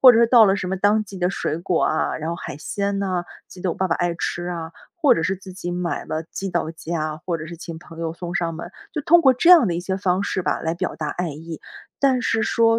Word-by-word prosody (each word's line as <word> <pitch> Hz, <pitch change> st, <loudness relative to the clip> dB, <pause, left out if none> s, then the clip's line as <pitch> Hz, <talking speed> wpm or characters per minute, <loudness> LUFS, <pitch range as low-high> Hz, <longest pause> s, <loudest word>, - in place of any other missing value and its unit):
或 255 Hz, -2 st, +10 dB
者 225 Hz, -, +4 dB
是 235 Hz, -, +6 dB
到 235 Hz, -3 st, +8 dB
了 195 Hz, -1 st, +4 dB
什 185 Hz, -2 st, -3 dB
么 190 Hz, -, -1 dB
当 205 Hz, +3 st, +3 dB
季 195 Hz, -1 st, -9 dB
的 180 Hz, 0 st, +2 dB
水 160 Hz, -4 st, -2 dB
果 175 Hz, -1 st, 0 dB
啊， 155 Hz, -, 0 dB
然 160 Hz, +2 st, -3 dB
后 170 Hz, -, -3 dB
海 145 Hz, -, -7 dB
鲜 200 Hz, +5 st, -2 dB
呐， 185 Hz, -3 st, -1 dB, 0.2 s
记 180 Hz, -, -12 dB
得 180 Hz, -, 0 dB
我 -, -, -10 dB
爸 190 Hz, -, 0 dB
爸 165 Hz, -, +2 dB
爱 175 Hz, -1 st, 0 dB
吃 175 Hz, +1 st, -3 dB
啊， 165 Hz, -2 st, -5 dB, 0.2 s
或 305 Hz, -5 st, +5 dB
者 165 Hz, -, -1 dB
是 190 Hz, -, +1 dB
自 190 Hz, 0 st, -11 dB
己 175 Hz, -1 st, -5 dB
买 175 Hz, -1 st, -2 dB
了 160 Hz, +1 st, -3 dB
寄 195 Hz, +3 st, -5 dB
到 170 Hz, -2 st, -1 dB
家， 160 Hz, -1 st, -3 dB
或 170 Hz, -2 st, 0 dB
者 155 Hz, -, -6 dB
是 170 Hz, -, -8 dB
请 165 Hz, -1 st, -8 dB
朋 165 Hz, -1 st, -13 dB
友 165 Hz, -1 st, -2 dB
送 175 Hz, 0 st, -6 dB
上 165 Hz, -1 st, -1 dB
门， 170 Hz, +2 st, -7 dB, 0.2 s
就 305 Hz, -, -2 dB
通 340 Hz, +3 st, +6 dB
过 265 Hz, -4 st, +6 dB
这 335 Hz, +8 st, +4 dB
样 335 Hz, -, +9 dB
的 170 Hz, -, 0 dB
一 175 Hz, -, -2 dB
些 190 Hz, +1 st, -2 dB
方 185 Hz, 0 st, +1 dB
式 185 Hz, -2 st, -1 dB
吧 -, -, 0 dB
来 160 Hz, +1 st, -1 dB
表 -, -, -3 dB
达 155 Hz, -2 st, -3 dB
爱 175 Hz, -2 st, -2 dB
意。 160 Hz, +2 st, -8 dB, 0.4 s
但 260 Hz, -3 st, +3 dB
是 225 Hz, -1 st, +1 dB
说 230 Hz, -1 st, +3 dB
180 Hz, 300 characters per minute, -22 LUFS, 165-200 Hz, 0.4 s, 或